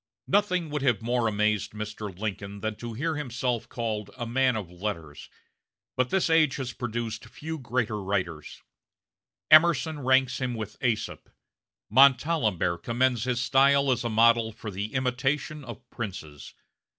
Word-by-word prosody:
Nothing 180 -6 +1
would 150 -1 -2
have 120 -5 +1
more 120 0 +1
amazed 105 -1 0
Mr. 105 0 -5
Lincoln 100 -1 -5
than 110 -1 -2
to 120 -1 -6
hear 155 +7 -2
himself 125 -4 -2
called 110 -4 -3
a 120 - -3
man 130 +1 +2
of 100 -6 -5
letters; 85 -5 -6 0.7
but 130 0 +1
this 190 -1 +2
age 160 -4 +4
has 130 -3 -4
produced 115 -2 -4
few 160 +1 -7
greater 115 -4 -2
writers. 90 -6 -3 0.9
Emerson 155 -1 +5
ranks 130 -1 +2
him 125 -2 -1
with 110 +1 -7
Aesop; 115 -3 -2 0.6
Montalembert 125 - +3
commends 120 +1 +1
his 125 -1 0
style 140 +1 +4
as 125 -1 0
a 120 - -1
model 115 0 +4
for 110 -1 -8
the 100 +5 -5
imitation 130 +4 -1
of 125 -2 -10
princes. 90 - -7
120 Hz, 145 wpm, -27 LUFS, 105-135 Hz, 0.9 s, Emerson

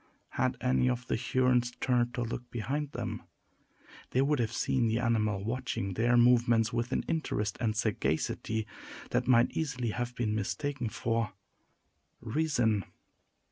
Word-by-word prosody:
Had 130 -1 0
any 125 0 +2
of 125 0 -2
the - - 0
Hurons 125 0 +2
turned 120 -2 +1
to 120 - -1
look 120 +1 -5
behind 135 +6 -3
them, - - -4 0.9
they 130 - +2
would 145 0 +1
have 115 -2 0
seen 125 -3 +1
the 110 0 +1
animal 110 -4 +1
watching 115 -5 -2
their 120 +5 +3
movements 120 -2 +4
with 120 +2 -1
an - - 0
interest 105 -10 -1
and 110 -3 +1
sagacity 110 +1 -1 0.5
that - - +1
might 120 -1 +5
easily 125 -7 -2
have 120 +2 -3
been 110 -3 0
mistaken 125 +4 -2
for 115 -1 -1 0.9
reason. 120 -5 +1
120 Hz, 140 wpm, -30 LUFS, 110-125 Hz, 0.9 s, might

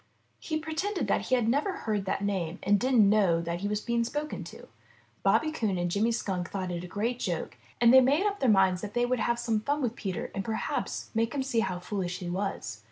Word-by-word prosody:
He 315 - -2
pretended 320 +6 -2
that - - +1
he 255 - +3
had 240 -3 +1
never 290 - +1
heard 215 - -2
that 195 +1 -1
name 185 -4 -1
and 205 +1 +3
didn't 245 -4 +4
know 195 -5 +4
that 170 +1 -3
he 200 - -2
was 210 0 -1
being 235 0 0
spoken 295 +6 -4
to. - - -11 0.5
Bobby 310 - +3
Coon 220 -11 -1
and 175 0 -1
Jimmy 215 +5 +2
Skunk 190 -6 -2
thought 185 -2 -3
it 175 0 -4
a - - -6
great 230 +6 -2
joke 175 -7 -3 0.2
and 235 0 +6
they 260 - +9
made 285 +9 +3
up 410 -1 0
their 260 - +2
minds 190 -3 +4
that 210 +1 -7
they 240 0 +3
would 250 0 0
have 235 +1 +1
some 225 -2 0
fun 285 +7 -1
with 245 -4 -1
Peter 190 -3 -4
and 195 - -3
perhaps 220 +2 -3
make 230 +3 0
him 270 - 0
see 255 -4 0
how 190 -5 -1
foolish 180 -1 -3
he 175 -1 -5
was. 180 - -3
215 Hz, 235 wpm, -29 LUFS, 190-250 Hz, 0.5 s, they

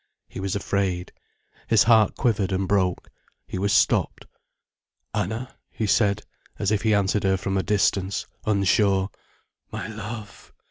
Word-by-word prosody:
He - - -9
was 95 0 -2
afraid. 95 -3 -1 0.6
His 115 -2 +5
heart 110 -3 +4
quivered 105 -6 +1
and 95 0 0
broke. 95 -3 0 0.4
He 95 - -5
was 100 +1 +1
stopped. - - +2 0.9
"Anna," 110 +7 -3 0.2
he 110 - -3
said, 105 0 +2 0.3
as 100 0 0
if 105 -2 +1
he 110 -1 +3
answered 100 0 +1
her 95 0 +2
from 95 +1 -3
a 95 - +2
distance, 100 -1 0 0.2
unsure. 100 -1 +2 0.6
"My - - -5
love." 105 -1 -8
100 Hz, 140 wpm, -24 LUFS, 95-105 Hz, 0.9 s, His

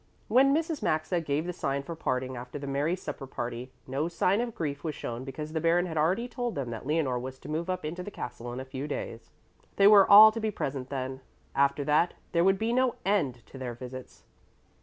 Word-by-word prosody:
When 260 +5 +5
Mrs. 320 +1 0
Maxa 155 +3 0
gave 150 0 -1
the 180 - -3
sign 140 -4 -2
for 170 - -6
parting 130 -3 -2
after 125 +3 -7
the 140 - -6
merry 140 +5 0
supper 150 -6 -7
party, 120 0 -5
no 135 +5 -1
sign 180 +5 +1
of 240 -2 -4
grief 145 -3 -3
was 155 -3 -3
shown 120 +1 -5
because 150 +4 -6
the 160 - -1
Baron 170 +2 +3
had 165 -3 -5
already 180 +10 +1
told 245 -1 -3
them 130 -4 -3
that 115 +2 -6
Leonore 145 -5 +1
was 130 +1 -6
to - - -12
move 160 +4 -3
up 185 -3 -2
into 170 +4 -4
the 180 - -6
castle 120 - -7
in 125 - -5
a 130 - -6
few 135 +2 -5
days. 115 -5 -5 0.5
They 195 - +4
were 200 -1 +8
all 215 +2 +11
to 225 - -4
be 220 -1 0
present 135 -9 -4
then. 130 -1 -4 0.3
After 140 +1 +2
that 150 +4 +2 0.2
there 170 0 +3
would 195 +1 +4
be 225 +3 0
no 255 -1 +2
end 145 - 0
to 135 - -12
their 125 -2 -4
visits. 130 +1 -9
150 Hz, 225 wpm, -29 LUFS, 130-185 Hz, 0.5 s, all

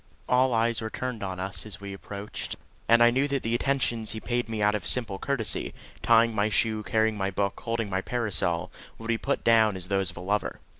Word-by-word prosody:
All 130 +1 +3
eyes 115 0 +1
were 110 - -3
turned 125 -1 -4
on 95 -2 -4
us 95 -2 -2
as 105 -5 -6
we 100 0 -7
approached, 100 +1 -6 0.3
and 115 0 +7
I 120 - +6
knew 135 +4 +2
that 140 -2 -2
the 115 - -1
attentions 120 -4 +1
he 110 - -4
paid 120 0 -2
me 110 -1 -3
out 105 0 +3
of 100 -5 -3
simple 110 -6 +1
courtesy 120 -7 -1 0.3
tying 115 0 +4
my 105 0 +1
shoe, 110 0 +1
carrying 110 +1 +1
my 95 -1 0
book, 100 0 -2
holding 115 -2 -2
my 95 -1 -1
parasol 105 -8 -1 0.3
would 115 0 -8
be 115 -1 +1
put 140 - -1
down 110 -3 +4
as 90 0 -7
those 95 -2 +2
of 85 - -10
a - - -6
lover. 100 +3 -1
110 Hz, 220 wpm, -27 LUFS, 100-115 Hz, 0.3 s, and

